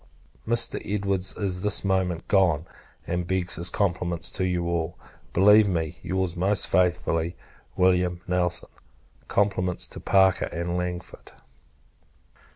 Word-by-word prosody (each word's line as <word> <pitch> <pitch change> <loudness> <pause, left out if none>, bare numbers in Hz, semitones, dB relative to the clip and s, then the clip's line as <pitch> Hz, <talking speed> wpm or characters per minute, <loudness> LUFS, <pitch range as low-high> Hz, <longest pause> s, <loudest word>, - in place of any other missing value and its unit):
Mr. 115 +1 +4
Edwards 100 -2 0
is 95 -3 -2
this 105 0 +1
moment 95 -3 -1
gone, 90 -6 +2 0.4
and 85 0 -3
begs 90 -2 -1
his 85 +1 +1
compliments 90 -3 -1
to 95 - -2
you 90 -1 -1
all. 85 -1 -2 0.3
Believe 105 +2 +6
me, 80 -3 -2
your's 95 -2 -2
most 95 +3 +2
faithfully, 85 -1 0 0.4
Wm. 90 -1 +2
NELSON. 90 -1 -1 0.6
Compliments 95 -3 0
to - - -8
Parker 95 -1 +3
and 85 +1 -4
Langford. 90 0 -6
90 Hz, 120 wpm, -25 LUFS, 85-95 Hz, 0.6 s, Believe